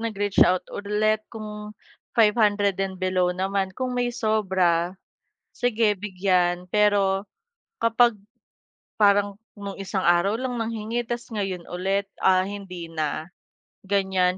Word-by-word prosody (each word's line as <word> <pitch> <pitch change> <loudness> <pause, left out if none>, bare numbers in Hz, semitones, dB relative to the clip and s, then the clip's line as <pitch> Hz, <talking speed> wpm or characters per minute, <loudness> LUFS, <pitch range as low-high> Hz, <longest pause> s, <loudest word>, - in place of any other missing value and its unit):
nag-reach 205 -3 -1
out 185 0 +1
ulit 210 +1 0
kung 210 -1 -7 0.4
500 210 -3 +3
and 190 -1 -2
below 185 -1 +1
naman, 190 +1 -1
kung 255 -1 -2
may 245 -1 0
sobra, 190 -6 +1 0.6
sige 225 -3 +2
bigyan, 180 -2 0
pero 200 -1 +2 0.5
kapag, 230 -1 +3 0.8
parang 205 -1 +3 0.2
nung 200 -2 -7
isang 195 -1 -2
araw 175 +4 +4
lang 255 -1 -3
nanghingi, 225 +1 -2
ta's 240 0 -4
ngayon 195 -5 -3
ulit, 195 +3 0 0.2
ah, 185 -1 +5
hindi 185 -4 -7
na, 155 +1 -3 0.6
gan'yan. 190 -2 +1
200 Hz, 115 wpm, -24 LUFS, 185-215 Hz, 0.8 s, ah